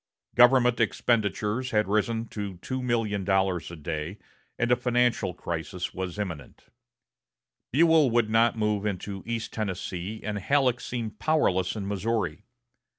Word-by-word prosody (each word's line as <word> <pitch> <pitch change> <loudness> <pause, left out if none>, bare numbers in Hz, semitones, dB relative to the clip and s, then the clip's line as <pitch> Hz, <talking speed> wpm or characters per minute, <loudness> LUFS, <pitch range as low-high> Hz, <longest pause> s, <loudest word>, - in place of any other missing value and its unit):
Government 125 -1 +5
expenditures 110 +1 0
had 105 -3 +1
risen 110 +3 0
to 100 -3 -5
$2,000,000 100 -6 0
a - - -7
day, 80 +3 -4 0.4
and 120 +1 0
a - - +7
financial 120 -7 +1
crisis 85 +2 -4
was 95 0 -4
imminent. 85 -9 -6 1.1
Buell 160 0 +5
would 120 -1 +2
not 115 +1 +3
move 105 -2 0
into 100 0 -4
East 115 -1 -3
Tennessee, 95 0 -4
and 105 -1 -3
Halleck 130 +2 +2
seemed 115 -4 -5
powerless 95 - +1
in 100 -3 -4
Missouri. 100 -3 -2
105 Hz, 125 wpm, -27 LUFS, 95-120 Hz, 1.1 s, a